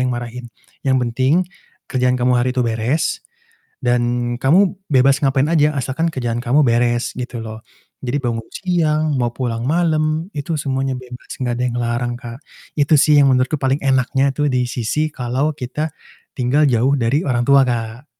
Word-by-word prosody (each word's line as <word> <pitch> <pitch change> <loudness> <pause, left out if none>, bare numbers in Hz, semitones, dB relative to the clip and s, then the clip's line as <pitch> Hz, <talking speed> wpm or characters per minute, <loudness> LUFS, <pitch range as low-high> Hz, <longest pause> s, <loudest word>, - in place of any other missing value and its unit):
yang 125 - 0
marahin, 120 +1 -7 0.4
yang 130 -1 +1
penting, 130 +8 +1 0.4
kerjaan 125 -1 0
kamu 125 +1 +3
hari 125 +1 +1
itu 130 - -1
beres, 115 +5 -1 0.6
dan 120 0 0
kamu 185 +7 +3 0.2
bebas 135 +1 +5
ngapain 135 0 +2
aja 150 -2 +3
asalkan 140 +5 -1
kerjaan 120 -4 -2
kamu 125 +5 +3
beres 120 0 +1
gitu 125 -2 -5
loh, 110 0 -9 0.4
jadi 130 +3 -1
bangun, 115 -3 -2
siang 155 -5 0
mau 120 -1 -1
pulang 120 -3 -3
malam 155 +1 0
itu 145 +3 -3
semuanya 135 -1 -1
bebas 125 -1 -11
gak 125 -3 -2
ada - - -3
yang 120 -1 -2
ngelarang 120 0 -1
Kak, 120 0 -9 0.4
itu 145 +1 +2
sih 150 +2 +4
yang 140 - +5
menurutku 130 +3 +2
paling 135 +1 +2
enaknya 135 +1 +2
tuh 150 0 +1
di 125 -1 +1
sisi 130 +7 -1
kalau 130 +5 -1
kita, 150 +3 -4 0.4
tinggal 130 +4 +2
jauh 125 +3 +2
dari 130 +5 +1
orang 125 -4 +1
tua, 140 +1 +6
Kak. 115 +1 -3
130 Hz, 170 wpm, -19 LUFS, 120-145 Hz, 0.6 s, tua